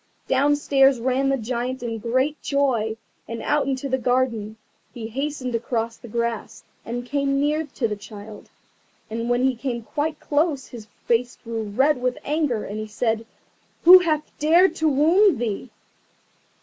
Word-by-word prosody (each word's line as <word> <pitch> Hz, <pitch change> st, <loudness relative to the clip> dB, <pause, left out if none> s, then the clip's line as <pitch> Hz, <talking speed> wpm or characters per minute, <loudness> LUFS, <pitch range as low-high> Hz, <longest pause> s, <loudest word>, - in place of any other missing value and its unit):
Downstairs 275 Hz, -1 st, +3 dB
ran 260 Hz, +3 st, +1 dB
the 275 Hz, -, +2 dB
Giant 245 Hz, +2 st, -3 dB
in 230 Hz, -2 st, -3 dB
great 260 Hz, +6 st, 0 dB
joy, 245 Hz, -6 st, 0 dB, 0.3 s
and 230 Hz, 0 st, -5 dB
out 295 Hz, -2 st, +1 dB
into 270 Hz, 0 st, -2 dB
the 260 Hz, 0 st, 0 dB
garden. 235 Hz, -4 st, 0 dB, 0.3 s
He 230 Hz, -2 st, -7 dB
hastened 270 Hz, 0 st, -3 dB
across 230 Hz, -1 st, -2 dB
the 240 Hz, -, -13 dB
grass, 230 Hz, -1 st, -3 dB, 0.2 s
and 240 Hz, +1 st, -5 dB
came 275 Hz, +1 st, 0 dB
near 300 Hz, +2 st, 0 dB
to 235 Hz, -, 0 dB
the 210 Hz, -, -3 dB
child. 210 Hz, +1 st, -11 dB, 0.6 s
And 230 Hz, +1 st, -3 dB
when 245 Hz, +1 st, +2 dB
he 265 Hz, -1 st, +2 dB
came 240 Hz, -1 st, -4 dB
quite 300 Hz, +6 st, -3 dB
close 290 Hz, -2 st, 0 dB
his 225 Hz, -3 st, -10 dB, 0.2 s
face 240 Hz, +1 st, +1 dB
grew 230 Hz, -1 st, -4 dB
red 260 Hz, +6 st, +2 dB
with 250 Hz, 0 st, 0 dB
anger, 290 Hz, -7 st, 0 dB
and 210 Hz, +2 st, -5 dB
he 215 Hz, -, -5 dB
said, 225 Hz, +1 st, -1 dB, 0.6 s
"Who 365 Hz, +2 st, +11 dB
hath 310 Hz, -4 st, 0 dB, 0.2 s
dared 340 Hz, +5 st, +5 dB
to 315 Hz, 0 st, +2 dB
wound 325 Hz, +5 st, +4 dB
thee?" 230 Hz, +1 st, -3 dB
255 Hz, 160 wpm, -23 LUFS, 230-285 Hz, 0.6 s, Who